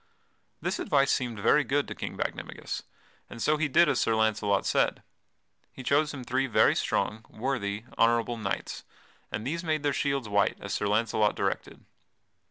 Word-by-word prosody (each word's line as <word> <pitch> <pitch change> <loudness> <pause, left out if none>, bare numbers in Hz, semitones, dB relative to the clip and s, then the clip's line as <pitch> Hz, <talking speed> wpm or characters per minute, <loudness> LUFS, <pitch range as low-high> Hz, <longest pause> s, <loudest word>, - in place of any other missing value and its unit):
This - - -1
advice 135 0 +2
seemed 120 -4 -1
very 150 +8 +4
good 140 +3 0
to - - -5
King - - -6
Bagdemagus, - - -4 0.5
and 115 - -9
so 150 +7 +2
he 155 0 +1
did 170 +4 +5
as - - +2
Sir 115 - +2
Launcelot 110 -2 +1
said. - - +1 0.7
He 130 - -10
chose 145 +4 +2
him 135 -3 -7
three 130 +2 0
very 120 - +4
strong, 110 +1 -1
worthy, 110 -4 -3 0.2
honorable 115 +1 +3
knights, 105 -3 -4 0.5
and 110 - -4
these 165 +6 -2
made 155 -2 -1
their 145 -1 +1
shields 140 -5 -1
white 100 -1 +2
as 100 0 -5
Sir 105 - 0
Launcelot 105 0 +2
directed. - - -3
120 Hz, 170 wpm, -28 LUFS, 110-140 Hz, 0.7 s, did